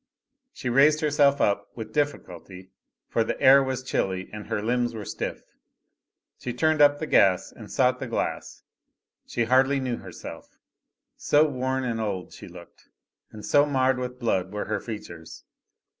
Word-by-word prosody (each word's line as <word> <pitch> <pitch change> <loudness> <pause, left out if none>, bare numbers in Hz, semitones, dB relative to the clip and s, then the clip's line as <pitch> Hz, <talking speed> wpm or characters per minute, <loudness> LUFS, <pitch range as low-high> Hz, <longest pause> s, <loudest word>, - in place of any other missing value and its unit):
She 135 - -7
raised 145 +5 +4
herself 145 -2 +3
up, 100 0 +1
with 110 -2 -8
difficulty, 95 - -4 0.4
for 115 - +1
the - - -4
air 135 +1 +7
was 130 -1 -3
chilly 95 -7 -2
and 105 -1 -8
her - - -2
limbs 120 +2 -1
were 105 -2 -6
stiff. - - -5 1.0
She 125 - -5
turned 155 +4 +1
up 145 0 +6
the 155 - -4
gas 95 - +3
and - - -12
sought - - +2
the - - -5
glass. - - -4 0.6
She 120 - -1
hardly 130 +4 +3
knew 125 -3 -2
herself, 90 -3 -11 0.6
so 150 +2 +3
worn 130 -1 -2
and 115 -3 -2
old 100 -4 -4
she - - -11
looked, 85 -1 -15 0.4
and 105 -1 -10
so 145 +1 +4
marred 130 -2 +1
with 125 0 -5
blood 95 -6 -1
were 105 0 -4
her 110 - -2
features. 85 -8 -9
125 Hz, 160 wpm, -25 LUFS, 105-135 Hz, 1.0 s, air